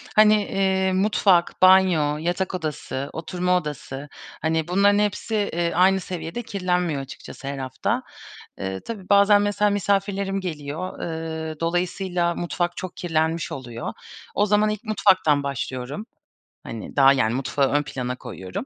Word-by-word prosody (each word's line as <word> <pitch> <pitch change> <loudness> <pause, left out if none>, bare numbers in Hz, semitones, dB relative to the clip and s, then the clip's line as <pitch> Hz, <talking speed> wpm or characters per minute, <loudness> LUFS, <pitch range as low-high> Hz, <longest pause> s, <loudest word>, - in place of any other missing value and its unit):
hani, 215 0 +7
eee, 190 -1 +1
mutfak, 190 -2 +2
banyo, 185 -6 +5
yatak 175 +4 -2
odası, 150 -4 -4
oturma 180 +2 0
odası, 145 -3 -6 0.3
hani, 160 0 0
bunların 200 +3 +4
hepsi, 210 +2 -1 0.2
eee, 170 0 0
aynı 190 +2 +5
seviyede 175 +3 -5
kirlenmiyor 180 -7 -1
açıkçası 135 0 -10
her 140 - -3
hafta, 130 -2 -2 0.6
eee, 95 0 -3
tabii 205 -5 -7
bazen 200 0 +6
mesela 205 0 +2
misafirlerim 195 0 0
geliyor, 155 0 -5
ııı, 160 -1 -4
dolayısıyla 175 0 0
mutfak 175 0 -2
çok 185 -1 -6
kirlenmiş 160 -1 -1
oluyor. 120 -4 -6 0.4
O 205 - +3
zaman 210 +1 +3
ilk 215 +1 -4
mutfaktan 185 -9 +3
başlıyorum. 135 - -4 0.6
Hani, 115 -2 -7
daha, 135 -1 +7
yani, 120 -4 +1
mutfağı 135 +1 0
ön 145 0 +2
plana 125 -3 -4
koyuyorum. 115 - -7
175 Hz, 135 wpm, -23 LUFS, 145-195 Hz, 0.6 s, hani